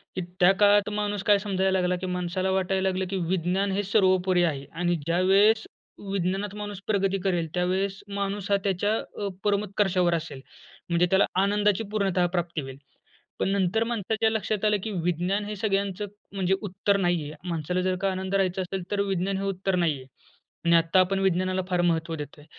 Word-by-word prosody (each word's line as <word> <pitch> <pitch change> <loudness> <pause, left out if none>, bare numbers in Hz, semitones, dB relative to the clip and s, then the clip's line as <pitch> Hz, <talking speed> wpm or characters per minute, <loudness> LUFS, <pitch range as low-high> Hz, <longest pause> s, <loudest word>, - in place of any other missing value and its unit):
की 185 - -2 0.2
त्या 180 +1 +7
काळात 205 0 +5
माणूस 205 -1 -2
काय 205 -1 +4
समजायला 190 -2 0
लागला 180 0 +1
की - - -3
माणसाला 180 +1 -1
वाटायला 190 0 +1
लागलं 185 0 -2
की 195 - -2
विज्ञान 185 +2 0
हे 200 +2 0
सर्वोपरी 185 -3 +3
आहे 145 -5 -1
आणि 175 0 0
ज्यावेळेस 195 +6 +4 0.5
विज्ञानात 195 +2 -1
माणूस 205 -2 -6
प्रगती 195 -2 +1
करेल, 175 -4 0
त्यावेळेस 190 +2 -1
माणूस 200 0 -3
हा 200 - +5
त्याच्या 205 +2 +1 0.3
अ, - - 0 0.2
परमोत्कर्षावर 200 -3 +1
असेल. 155 -5 -5 0.5
म्हणजे 170 +1 +3
त्याला 190 +1 +4 0.2
आनंदाची 205 +1 +2
पूर्णतः 195 -4 +1
प्राप्ती 175 -2 -1
होईल. 135 -1 -8 0.6
पण - - +1
नंतर 200 +3 +1
माणसाच्या 225 -1 0
लक्षात 215 -1 -1
आलं 210 -1 +3
की 220 - -3
विज्ञान 180 +4 0
हे 210 0 -5
सगळ्यांचं 200 0 -1 0.3
म्हणजे 190 -1 +1
उत्तर 200 0 0
नाहीये. 175 -5 0 0.2
माणसाला 170 +2 -1
जर 185 0 0
का 195 - +2
आनंद 190 +1 -3
राहायचा 190 -1 +1
असेल 185 0 -4
तर 200 - +1
विज्ञान 195 -1 -1
हे 195 - -3
उत्तर 195 0 -1
नाहीये 155 -7 0 0.6
आणि 170 0 +5
आत्ता 165 +3 +4
आपण 195 +1 +2
विज्ञानाला 185 0 +1
फार 180 -1 +1
महत्व 165 -1 0
देतोय. 150 -1 -9
190 Hz, 175 wpm, -26 LUFS, 180-200 Hz, 0.6 s, त्या